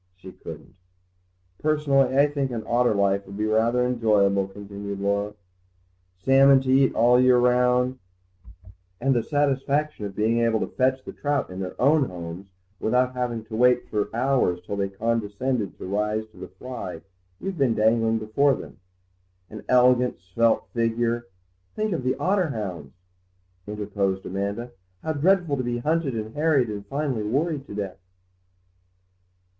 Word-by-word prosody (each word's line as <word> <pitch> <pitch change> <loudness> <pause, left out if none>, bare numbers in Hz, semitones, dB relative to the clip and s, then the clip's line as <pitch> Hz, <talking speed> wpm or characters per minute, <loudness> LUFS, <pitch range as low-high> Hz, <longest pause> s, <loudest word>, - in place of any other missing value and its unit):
She 95 0 -11
couldn't. - - -11 0.9
"Personally 140 -4 +2
I 140 - +6
think 145 -2 -2
an 115 -3 -4
otter 120 -1 +2
life 100 0 +1
would 100 +1 -9
be 105 - -1
rather 115 +3 +2
enjoyable," 105 -5 +2
continued 100 0 -7
Laura; 100 +1 -1 0.8
"salmon 135 +6 +5
to 130 -1 -1
eat 135 0 +4
all 120 +2 +5
the - - +4
year 125 -1 +5
round, 125 +1 +2 1.0
and 135 +2 +2
the 120 - +2
satisfaction 145 -2 0
of 95 - -11
being 110 +2 +1
able 115 -1 +2
to - - -5
fetch 130 +1 +1
the - - -7
trout 145 -7 -2
in 90 - -7
their 95 -1 -6
own 145 +2 +4
homes 90 -1 -8 0.3
without 125 +3 +1
having 120 -3 -3
to 110 - -7
wait 125 +1 +3
for 105 -1 -1
hours 125 -7 +1
till 100 - -4
they 100 -1 -1
condescend 115 +4 -1 0.2
to - - -8
rise 105 +3 -1
to - - -21
the - - -8
fly 120 -10 -7 0.4
you've 195 -4 -5
been 125 -5 +2
dangling 115 +1 +2
before 120 +6 +2
them; - - -11 0.7
and 110 - -7
an - - -15
elegant 125 0 +4
svelte 110 +6 +1
figure—" 115 0 0 0.5
"Think 215 -2 -1
of 165 - -2
the 130 +1 +1
otter 190 -1 +1
hounds," 90 - -6 0.7
interposed 100 -2 -2
Amanda; 100 +6 -3 0.3
"how 160 - -1
dreadful 170 -1 +2
to 130 - -2
be 120 0 -2
hunted 150 +1 0
and 110 0 -5
harried 145 -6 +2
and 100 -1 -6
finally 135 -3 -2
worried 140 +6 -1
to - - -8
death!" 100 -3 -5
120 Hz, 160 wpm, -24 LUFS, 105-135 Hz, 1.0 s, I